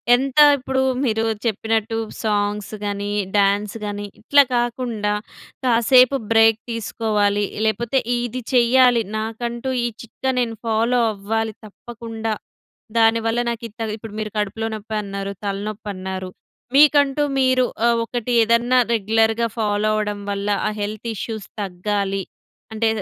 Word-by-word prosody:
ఎంత 270 +3 -3 0.2
ఇప్పుడు 265 0 -1 0.2
మీరు 225 -3 +1 0.2
చెప్పినట్టు 225 0 0 0.3
సాంగ్స్ 205 0 -1
గాని, 205 0 -3 0.2
డ్యాన్స్ 200 +1 +2
గాని, 205 0 -4 0.2
ఇట్లా 285 0 +5
కాకుండా 240 -3 -1 0.5
కాసేపు 250 +2 +5
బ్రేక్ 225 0 +5
తీసుకోవాలి. 210 -2 0 0.2
లేపోతే 235 +4 +1 0.2
ఇది 245 +1 -3
చేయాలి 245 -1 +5
నాకంటూ 235 +3 -3
ఈ - - +2
చిట్కా 260 +3 -3
నేను 230 -3 -1
ఫాలో 230 +3 +2
అవ్వాలి, 220 +2 -2
తప్పకుండా. 225 0 -6 0.7
దానివల్ల 225 +1 +3
నాకు 235 0 -4
ఇంత 225 +2 -12 0.2
ఇప్పుడు 220 -1 -10
మీరు 215 -1 -4
కడుపులో 210 +2 -2
నొప్పి 215 +1 -6
అన్నారు, 200 0 -5
తలనొప్పి 205 +1 -4
అన్నారు, 185 0 -5 0.5
మీకంటూ 290 0 +5 0.2
మీరు 255 -1 +3 0.4
ఒకటి 245 0 -4
ఏదన్నా 235 +3 +3 0.2
రెగ్యులర్‌గా 225 +1 +2
ఫాలో 210 -1 +1
అవ్వడం 210 -1 -2
వల్ల, 200 0 -3 0.2
ఆ - - +1
హెల్త్ 215 +3 -4
ఇష్యూస్ 215 0 -5 0.2
తగ్గాలి 195 +1 -2 0.5
అంటే, 225 +1 +1
225 Hz, 120 wpm, -21 LUFS, 205-240 Hz, 0.7 s, ఇట్లా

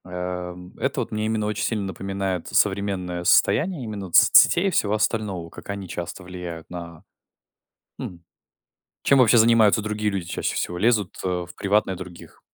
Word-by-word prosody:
Эм, 90 0 -6
это - - -1
вот - - -5
мне 110 0 -2
именно 110 -1 -1
очень 105 0 -2
сильно 105 -1 -1
напоминает 95 -1 -3
современное 95 -3 0
состояние 165 - +3
именно 105 -3 -5
вот 85 - -4
соцсетей 175 +3 +6
и - - +1
всего 105 - +1
остального. 105 -5 -1
Как - - -13
они 100 -2 -5
часто 85 +2 -6
влияют 90 -2 -8
на 85 -1 -9 1.0
Хм. 85 -2 -7 0.8
Чем 140 - +4
вообще 120 -2 +5
занимаются 110 -2 +5
другие 105 0 -1
люди 95 -4 -4
чаще - - -3
всего? 90 - -3
Лезут, 105 -2 +1
э, - - 0 0.2
в - - -12
приватное 100 -1 +1
других? 90 -1 -11
100 Hz, 165 wpm, -23 LUFS, 90-105 Hz, 1.0 s, соцсетей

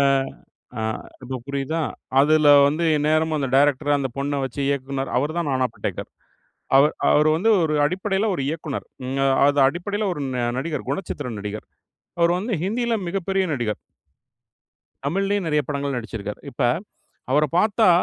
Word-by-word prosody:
அ - - +4 0.8
ஆ - - -2 0.4
இப்போ 130 +1 -5
புரியுதா? 140 +4 -2 0.4
அதுல 155 +1 +4 0.2
வந்து 155 +4 0
எந்நேரமும் 155 +1 +1
அந்த 135 -2 -1
டைரக்டர் 145 +1 +3
அந்த 135 -1 -1
பொண்ணை 140 +1 -1
வைச்சு 135 +2 -4
இயக்குனர். 135 -1 -2
அவர் 145 +5 +1
தான் 165 -4 -1
"நானா 130 -1 +2
படேகர்." - - -4 0.7
அவர் 145 +2 +5 0.2
அவர் 150 +1 +4
வந்து 220 +7 +2
ஒரு 155 -1 +1
அடிப்படையில 195 +4 -1
ஒரு 140 - -2
இயக்குனர். 155 -3 -4 0.6
அது 145 0 +2
அடிப்படையில 200 +8 -2
ஒரு 150 - -5 0.4
நடிகர், 150 0 -3
குணச்சித்திர 145 -4 -3
நடிகர். 105 +1 -6 0.5
அவர் 170 +1 +4
வந்து 215 +5 -3
ஹிந்தியில 235 +3 0
மிகப்பெரிய 195 +1 0
நடிகர். 120 -6 -2 1.3
தமிழ்லயும் 195 +3 0
நிறைய 150 -1 +2
படங்கள் 140 -2 -2
நடிசச்சிருக்கார். 110 -3 -6
இப்ப - - -6 0.7
அவரைப் 150 +1 +2
பார்த்தா, 215 -1 +3
150 Hz, 140 wpm, -23 LUFS, 140-175 Hz, 1.3 s, அவர்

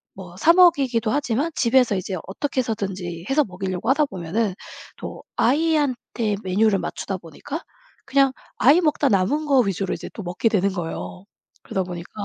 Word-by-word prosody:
뭐 180 -2 -10
사 325 - +5
먹이기도 275 -11 +4
하지만 285 +3 0
집에서 245 -3 +3
이제 185 0 -3
어떻게 265 +7 -3
해서든지 190 -7 -3
해서 290 +2 +4
먹이려고 185 +3 -4
하다 295 +2 +4
보면은 190 0 -2 0.4
또 - - -8
아이한테 260 -6 +1
메뉴를 200 +2 +2
맞추다 195 -1 -4
보니까 175 - -8 0.4
그냥 275 -1 +3 0.3
아이 285 +7 +6
먹다 295 -3 +2
남은 210 +11 +1
거 275 -3 +4
위주로 195 -2 -1
이제 170 - -6
또 215 - -7
먹게 180 +6 0
되는 200 -2 +1
거예요. 180 +1 -6 0.4
그러다 190 - -2
보니까 175 -1 -8
220 Hz, 365 characters per minute, -23 LUFS, 185-275 Hz, 0.4 s, 아이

